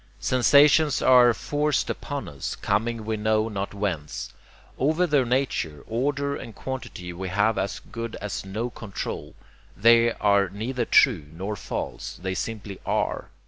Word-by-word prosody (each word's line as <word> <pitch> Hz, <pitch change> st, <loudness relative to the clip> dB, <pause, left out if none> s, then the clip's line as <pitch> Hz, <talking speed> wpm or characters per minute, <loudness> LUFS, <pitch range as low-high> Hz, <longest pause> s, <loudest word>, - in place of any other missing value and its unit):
Sensations 145 Hz, +4 st, +5 dB
are 125 Hz, -2 st, +7 dB
forced 145 Hz, +5 st, 0 dB
upon 145 Hz, -2 st, -4 dB
us, 70 Hz, -2 st, -5 dB
coming 115 Hz, 0 st, -1 dB
we 110 Hz, 0 st, -1 dB
know 110 Hz, +1 st, +1 dB
not 100 Hz, -1 st, -4 dB
whence. 80 Hz, -8 st, -3 dB, 0.5 s
Over 155 Hz, +7 st, +2 dB
their 145 Hz, -6 st, +2 dB
nature, 115 Hz, -, -1 dB
order, 140 Hz, +4 st, -1 dB
and 115 Hz, -, -8 dB
quantity 115 Hz, -9 st, -6 dB
we 95 Hz, +2 st, -5 dB
have 105 Hz, +4 st, +2 dB
as 100 Hz, -, -2 dB
good 115 Hz, -1 st, -7 dB
as 105 Hz, -3 st, -5 dB
no 110 Hz, +6 st, -4 dB
control. 105 Hz, -5 st, -6 dB, 0.4 s
THEY 115 Hz, +2 st, +5 dB
are 100 Hz, -2 st, +2 dB
neither 115 Hz, +5 st, -3 dB
true 75 Hz, -, +4 dB
nor 95 Hz, +6 st, -4 dB
false; -, -, -5 dB
they 95 Hz, +1 st, -3 dB
simply 105 Hz, -1 st, -5 dB
ARE. -, -, -1 dB
110 Hz, 145 wpm, -25 LUFS, 100-130 Hz, 0.5 s, are